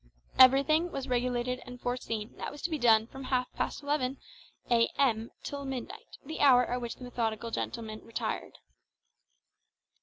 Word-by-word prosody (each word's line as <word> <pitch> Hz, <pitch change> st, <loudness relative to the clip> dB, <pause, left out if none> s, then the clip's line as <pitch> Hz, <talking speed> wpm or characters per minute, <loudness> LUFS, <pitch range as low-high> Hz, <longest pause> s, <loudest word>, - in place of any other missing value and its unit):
Everything 275 Hz, +6 st, +6 dB
was 270 Hz, -1 st, -4 dB
regulated 250 Hz, 0 st, -1 dB
and 250 Hz, 0 st, -10 dB
foreseen 230 Hz, -3 st, -3 dB
that -, -, -4 dB
was 290 Hz, -, -11 dB
to 340 Hz, -, -1 dB
be 310 Hz, -, -1 dB
done 225 Hz, -3 st, +5 dB
from 270 Hz, +3 st, -9 dB
half 250 Hz, -1 st, 0 dB
past -, -, -3 dB
eleven 280 Hz, -2 st, 0 dB, 0.5 s
a.m. 230 Hz, -1 st, +2 dB
till 285 Hz, -1 st, -5 dB
midnight, 265 Hz, -3 st, -7 dB
the 315 Hz, +3 st, -6 dB
hour 250 Hz, -3 st, +6 dB
at 245 Hz, +1 st, -2 dB
which 235 Hz, -1 st, -4 dB
the -, -, -12 dB
methodical 230 Hz, -2 st, -2 dB
gentleman 220 Hz, -1 st, -4 dB
retired. 230 Hz, -, -4 dB
250 Hz, 150 wpm, -30 LUFS, 235-270 Hz, 0.5 s, Everything